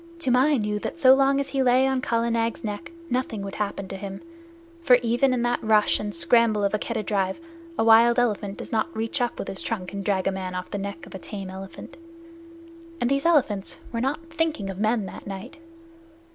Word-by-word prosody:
Toomai 270 -1 +3
knew 210 -2 -1
that 330 - -5
so 260 -5 +7
long 275 +1 +3
as 280 - -1
he 275 - 0
lay 255 0 +4
still 265 - +2
on 260 -1 0
Kala 235 -1 0
Nag's 230 0 -1
neck 210 +4 -5 0.2
nothing 245 -6 -2
would 195 -1 -6
happen 200 -2 -3
to - - -5
him, 195 0 -6 0.6
for 255 -7 +6
even 240 +3 +2
in 250 -2 0
the 240 0 +1
rush 215 -1 +3
and 210 0 -3
scramble 215 +5 +3
of 200 - +1
a 210 - +1
Keddah 225 0 -3
drive 195 - -1 0.4
a - - +2
wild 230 +2 +6
elephant 210 -4 0
does - - -8
not 280 +8 -1
reach 225 +4 -1
up 245 - -1
with - - -5
his 190 - -2
trunk 195 -6 -4
and 200 0 -4
drag 190 -1 0
a 195 - +2
man 185 -1 -5
off 180 0 -5
the 205 - -3
neck 195 -3 -6
of - - -13
a 190 - -6
tame 195 -1 -7
elephant. 190 -1 -10 1.0
And 245 - 0
these 275 +3 +2
elephants 245 - +1
were 230 - -2
not 290 +6 -2
thinking 315 -12 -1
of 190 - -9
men 215 0 +1
that 190 - -9
night. 195 -1 -7
225 Hz, 220 wpm, -25 LUFS, 195-255 Hz, 1.0 s, so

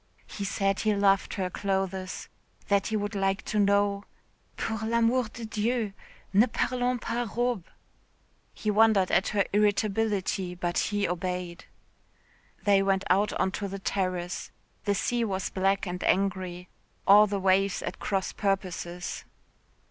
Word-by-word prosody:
He 200 - -6
said 195 0 0
he 215 -1 +1
loved 195 -1 +2
her 185 -2 -2
clothes 190 -1 -2 0.4
that 200 -1 +3
he 220 - -1
would 205 0 -3
like 195 -1 0
to 215 - -1
know.... 200 0 +2 0.5
"Pour 220 -1 -2
l'amour 235 +2 +2
de 230 0 -7
Dieu, 220 -1 -1 0.4
ne 210 +5 +6
parlons 250 -1 0
pas 240 +2 -2
robes." 240 -7 0 0.8
He 215 - -2
wondered 210 -3 +4
at 185 - +3
her 200 -2 +1
irritability, 205 -3 +1
but 175 0 -1
he 205 -1 0
obeyed. 180 0 -4 1.0
They 200 -1 +4
went 195 0 +1
out 200 +3 +3
on 190 - 0
to 200 +1 -3
the 195 +1 -5
terrace. 185 -2 -2 0.4
The 205 -1 +2
sea 240 +4 0
was 195 -4 -2
black 195 +1 +1
and 180 -1 -4
angry, 185 -2 0 0.4
all 205 +2 +8
the 200 -1 -2
waves 195 0 +2
at - - -5
cross 195 -2 -1
purposes. 180 -3 -3
195 Hz, 140 wpm, -28 LUFS, 190-210 Hz, 1.0 s, all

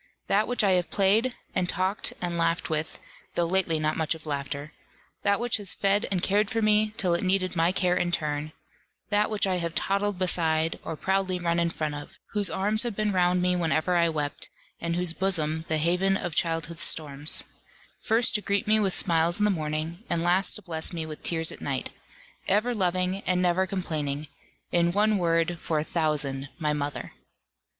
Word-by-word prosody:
That 210 +2 +2
which 245 -2 +1
I 200 - +4
have 180 -1 +1
played, 215 +6 +2 0.2
and 180 - -1
talked, 190 +1 +1
and 175 -1 -3
laughed 165 0 0
with, 155 0 -2 0.4
though 170 - +2
lately 175 -2 +1
not 155 0 0
much 160 0 0
of 160 - -13
laughter, 140 0 -4 0.5
that 200 0 +2
which 240 0 +1
has 205 -3 -1
fed 200 +1 +1
and 185 -2 -1
cared 205 +1 +2
for 225 - -1
me, 215 0 +2
till 180 -4 +2
it 170 - 0
needed 185 -1 +1
my 165 +1 +3
care 180 -1 +2
in 175 -1 0
turn; 150 -2 -2 0.6
that 210 +1 +3
which 215 -2 0
I 185 -1 0
have 170 -1 -3
toddled 200 0 0
beside, 165 -3 +1
or 160 - -4
proudly 190 +2 0
run 170 -1 0
in 170 0 +2
front 155 -2 -3
of; 145 0 -9
whose 205 -3 +2
arms 210 +3 0
have 240 -4 -1
been 215 0 0
round 180 0 +2
me 180 0 +3
whenever 170 0 +1
I 170 -1 +3
wept, 150 -2 -3 0.3
and 170 0 -2
whose 175 -1 0
bosom 160 -4 0
the 160 - +1
haven 180 +5 +2
of 175 -5 -4
childhood's 165 0 -1
storms; 150 -2 +3 0.6
first 230 +2 +2
to 210 - +1
greet 200 +1 -1
me 215 +1 +4
with 195 -3 +1
smiles 170 0 +1
in 210 - +2
the 210 - +3
morning, 160 +2 -3
and 170 -1 0
last 180 +2 +3
to 210 - 0
bless 160 -3 -2
me 165 -2 -4
with 155 -1 -8
tears 165 -1 +1
at - - -10
night; 135 -2 -3 0.6
ever 215 +5 +2
loving, 185 -1 0
and 180 0 +2
never 180 +1 +2
complaining 155 -6 -3 0.5
in 170 0 +2
one 210 +1 +2
word 165 0 +1
for 160 - -2
a 150 - +1
thousand, 145 -4 -1
my 150 -3 0
mother. 145 -1 -4
175 Hz, 195 wpm, -27 LUFS, 160-195 Hz, 0.6 s, I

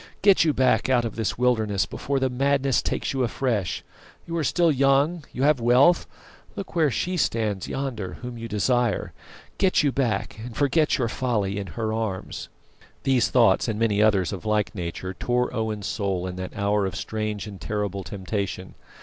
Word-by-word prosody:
Get 200 -3 +6
you 160 - +3
back 130 -1 +2
out 125 -2 +3
of 115 - -4
this 110 -3 -2
wilderness 110 -5 +2
before 140 0 -2
the 130 - +2
madness 135 0 +2
takes - - -2
you 135 - -1
afresh. 115 -5 -1 0.4
You 170 - -5
are 165 - 0
still 170 +3 +3
young, 140 +4 +2
you 130 - -2
have 150 -2 +4
wealth; 125 +9 +4 0.5
look 195 - -7
where 160 -3 +4
She 180 - -1
stands 110 - 0
yonder 115 -9 -4
whom 125 -1 -5
you 115 0 -6
desire. 120 +2 0 0.5
Get 190 -4 +3
you 145 - +3
back, 110 -6 -1
and 120 -2 -8
forget 150 +2 +2
your 125 -4 0
folly 105 -5 -1
in 100 - -5
her 110 -1 -1
arms." 110 -4 -4 0.5
These 130 -4 +3
thoughts, 115 -5 +4
and 110 -2 -1
many 105 -2 +2
others 100 -4 +3
of 95 - -6
like 105 -1 0
nature, 90 0 -5
tore 125 +5 -1
Owen's 110 -2 -2
soul 95 -4 -2
in 90 -1 -5
that 95 0 -6
hour 100 0 +1
of 95 - -6
strange 105 -2 -3
and 100 -5 -9
terrible 100 +2 -3
temptation. 95 0 -4
115 Hz, 180 wpm, -25 LUFS, 100-135 Hz, 0.5 s, Get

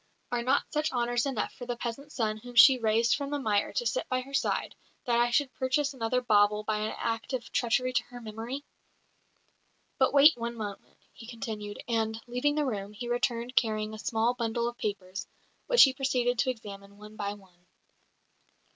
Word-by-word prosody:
Are 245 -1 0
not 260 +4 +2
such 305 0 0
honours 240 +1 0
enough 260 -6 -2
for 245 - -9
the 245 - -2
peasant's 250 +5 -6
son 215 -3 0
whom 245 +2 -11
she 260 +2 +8
raised 230 +1 +3
from 280 -1 -4
the 290 - -1
mire 210 -7 0
to 485 - -1
sit - - -1
by 255 -1 0
her 275 +2 -12
side, 275 - 0 0.3
that 235 -1 +2
I 240 0 +3
should 265 +2 +1
purchase 275 +2 0
another 250 0 0
bauble 210 -2 +3
by 215 0 -1
an 215 +1 -2
act 230 +3 -3
of 245 -2 -4
treachery 250 +1 +1
to - - +2
her 245 - -10
memory? 230 +5 -6 1.4
"But - - +4
wait 290 +3 +7
one 235 0 -4
moment," 205 -3 -7 0.2
he 230 - -12
continued; 215 -3 -6
and, 225 -1 0
leaving 250 +5 0
the 300 -1 +1
room, 205 -5 -4
he 240 +3 -6
returned 240 0 -1
carrying 215 -3 +1
a 215 - -8
small 225 +2 +1
bundle 235 -1 -1
of 240 0 -6
papers, 195 -2 -4 0.4
which - - +8
he 270 - +5
proceeded 250 -3 0
to 260 - +2
examine 200 -4 -7
one 210 +1 -12
by 205 -1 -3
one. 180 -3 -21
235 Hz, 190 wpm, -29 LUFS, 215-255 Hz, 1.4 s, she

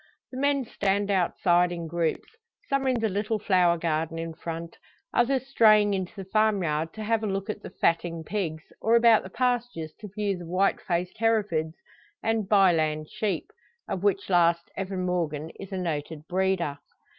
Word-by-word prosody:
The 255 - -6
men 280 -1 +1
stand 200 -1 0
outside 175 -1 +2
in 170 -1 -4
groups, 165 0 -2 0.3
some 275 -1 +1
in 255 -2 +2
the 225 - +2
little 210 +2 -1
flower 180 -4 +3
garden 165 0 -1
in 165 0 -4
front, 165 0 -6 0.4
others 260 +2 +2
straying 215 -5 +5
into 190 -2 -2
the 195 -2 -7
farmyard 180 -8 +1
to 220 - -6
have 225 +1 +1
a 215 - -2
look 195 +2 -2
at 210 - -9
the - - -8
fatting 165 -1 0
pigs, 160 -4 -3 0.2
or 225 +1 +3
about 230 -1 +6
the 190 - -9
pastures 240 -9 -1
to 210 - -8
view 200 -3 -1
the 175 - -8
white 185 +3 +1
faced 180 +3 -2
Herefords 205 -9 +1 0.5
and 220 -3 0
"Bye 195 -4 +6
land" 155 -1 -1
sheep; 210 -3 -2 0.4
of 185 - -3
which 200 -1 +1
last 170 -2 +2
Evan 190 -1 -3
Morgan 160 -4 -2
is 195 - -9
a 190 - -3
noted 160 -3 -3
breeder. 185 -5 0
190 Hz, 175 wpm, -27 LUFS, 165-215 Hz, 0.5 s, about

